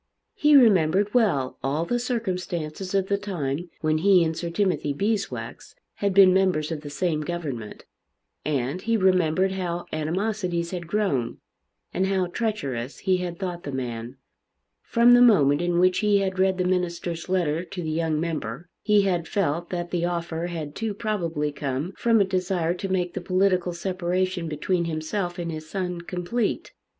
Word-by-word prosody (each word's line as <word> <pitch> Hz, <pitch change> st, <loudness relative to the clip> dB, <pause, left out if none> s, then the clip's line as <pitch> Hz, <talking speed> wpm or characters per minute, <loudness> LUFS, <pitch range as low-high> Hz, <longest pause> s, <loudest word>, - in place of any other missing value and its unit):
He 300 Hz, 0 st, +4 dB
remembered 200 Hz, -, +5 dB
well 175 Hz, -, +1 dB
all 145 Hz, +5 st, 0 dB
the 240 Hz, +6 st, 0 dB
circumstances 185 Hz, -7 st, -3 dB
of 195 Hz, -1 st, +2 dB
the 200 Hz, +1 st, 0 dB
time 175 Hz, -5 st, -3 dB
when 155 Hz, 0 st, +1 dB
he 185 Hz, 0 st, +5 dB
and 160 Hz, -1 st, -1 dB
Sir 170 Hz, +1 st, -4 dB
Timothy 180 Hz, -5 st, 0 dB
Beeswax 205 Hz, +6 st, -3 dB, 0.2 s
had 200 Hz, -1 st, 0 dB
been 190 Hz, -1 st, +7 dB
members 180 Hz, -5 st, +2 dB
of 155 Hz, -2 st, -3 dB
the 145 Hz, -, -8 dB
same 155 Hz, +1 st, -1 dB
government; 150 Hz, -10 st, -5 dB, 0.6 s
and 140 Hz, +3 st, -1 dB
he 230 Hz, +2 st, +1 dB
remembered 185 Hz, -1 st, +3 dB
how 175 Hz, -2 st, -3 dB
animosities 175 Hz, +2 st, -1 dB
had 175 Hz, -2 st, -5 dB
grown, 165 Hz, -, 0 dB, 0.6 s
and 190 Hz, -, +1 dB
how 190 Hz, -1 st, +1 dB
treacherous 150 Hz, -, -3 dB
he 190 Hz, -1 st, +1 dB
had 175 Hz, -1 st, -4 dB
thought 180 Hz, -2 st, -4 dB
the 145 Hz, -, -6 dB
man. 120 Hz, -1 st, -5 dB, 0.6 s
From 235 Hz, +1 st, +4 dB
the 245 Hz, -, +7 dB
moment 155 Hz, -, +5 dB
in 175 Hz, 0 st, 0 dB
which 185 Hz, +1 st, +4 dB
he 210 Hz, -1 st, +3 dB
had 190 Hz, -1 st, -1 dB
read 190 Hz, 0 st, +3 dB
the 185 Hz, -, +1 dB
minister's 175 Hz, -2 st, -2 dB
letter 170 Hz, -3 st, +1 dB
to 180 Hz, -1 st, -6 dB
the 155 Hz, -, -2 dB
young 160 Hz, -1 st, 0 dB
member, 155 Hz, -2 st, -4 dB
he 210 Hz, -2 st, +4 dB
had 175 Hz, -4 st, 0 dB
felt 170 Hz, -3 st, -1 dB
that 175 Hz, -1 st, -4 dB
the 175 Hz, -1 st, 0 dB
offer 170 Hz, -1 st, -2 dB
had 160 Hz, -4 st, -5 dB
too 220 Hz, +1 st, -3 dB
probably 170 Hz, -9 st, -2 dB
come 140 Hz, +4 st, -3 dB
from 230 Hz, -2 st, +3 dB
a -, -, +6 dB
desire 185 Hz, -3 st, 0 dB
to 190 Hz, +2 st, -5 dB
make 180 Hz, -2 st, 0 dB
the -, -, -4 dB
political 185 Hz, 0 st, +1 dB
separation 180 Hz, 0 st, -1 dB
between 170 Hz, +3 st, -1 dB
himself 175 Hz, +3 st, -3 dB
and 170 Hz, -1 st, -3 dB
his 155 Hz, 0 st, -7 dB
son 180 Hz, -2 st, -3 dB
complete. 180 Hz, +6 st, -2 dB
175 Hz, 170 wpm, -25 LUFS, 160-190 Hz, 0.6 s, been